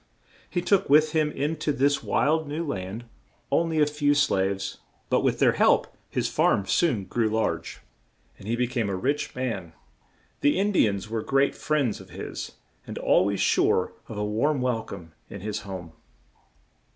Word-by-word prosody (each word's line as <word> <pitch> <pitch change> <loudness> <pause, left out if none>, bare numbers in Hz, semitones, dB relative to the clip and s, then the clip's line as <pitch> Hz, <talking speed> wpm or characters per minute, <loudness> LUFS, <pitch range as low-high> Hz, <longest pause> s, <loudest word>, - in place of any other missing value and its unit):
He 175 - -1
took 195 -2 +2
with 150 +2 +5
him 155 -1 +2
in 150 +3 -2
to 155 0 0
this 140 +1 +2
wild 160 +1 +1
new 155 +4 -3
land 100 -2 -5 0.5
on 165 0 +2
ly 160 - -2
a 155 -1 +4
few 145 -1 +1
slaves, 95 -8 0 0.3
but - - +3
with - - +1
their - - +4
help - - +2
his - - -1
farm 100 - +2
soon 115 - +1
grew 110 +3 0
large, 110 +1 -2 0.6
and 95 - -11
he 115 - 0
be 125 +1 +1
came 120 -4 -2
a 95 - -1
rich 140 +10 -1
man. 115 -10 -3 0.7
The 145 - +3
In 200 +2 +2
di 185 - +4
ans 100 0 -3
were 110 0 -2
great 135 +4 +2
friends 145 -7 -1
of - - -15
his, - - -6 0.3
and - - -6
al - - +3
ways 100 0 -1
sure 90 - +2
of 110 - -7
a 105 - -1
warm 130 +8 +1
wel 125 -3 0
come 85 -7 -10 0.2
in 100 - -8
his 105 +1 -3
home. 95 -4 -8
125 Hz, 185 wpm, -26 LUFS, 100-150 Hz, 0.7 s, with